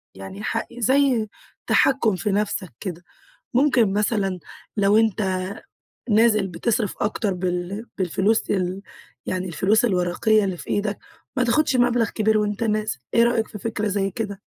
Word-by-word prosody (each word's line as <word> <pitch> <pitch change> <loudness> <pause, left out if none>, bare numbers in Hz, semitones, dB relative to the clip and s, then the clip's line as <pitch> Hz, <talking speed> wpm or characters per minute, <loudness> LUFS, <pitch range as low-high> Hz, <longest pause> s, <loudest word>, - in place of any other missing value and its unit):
يعني 190 - -9
ح 230 - -1
زي 255 -2 +2 0.4
تحكم 235 -7 +3
في 190 +3 -2
نفسك 195 -5 -1
كده، 175 -2 -6 0.5
ممكن 250 -6 +3
مثلًا 205 -2 0 0.4
لو 205 0 +3
أنت 200 -4 +1 0.7
نازل 215 -2 +4
بتصرف 210 +4 -1
أكتر 210 -1 0
بال 180 +4 -3
بالفلوس 190 +4 +1
ال 185 0 -1 0.5
يعني 185 0 -2
الفلوس 190 +7 +2
الورقية 200 +2 +2
اللي 185 -2 -3
في - - -10
إيدك، 205 0 -1 0.4
ما 250 - +3
تاخدش 265 +3 +2
مبلغ 245 -3 +2
كبير 220 0 +1
وأنت 210 +1 -1
نازل، 215 - -1 0.2
إيه 235 - +5
رأيك 235 -2 +1
في - - -9
فكرة 215 0 -2
زي 195 -1 -1
كده؟ 205 -2 -5
210 Hz, 145 wpm, -23 LUFS, 190-225 Hz, 0.7 s, إيه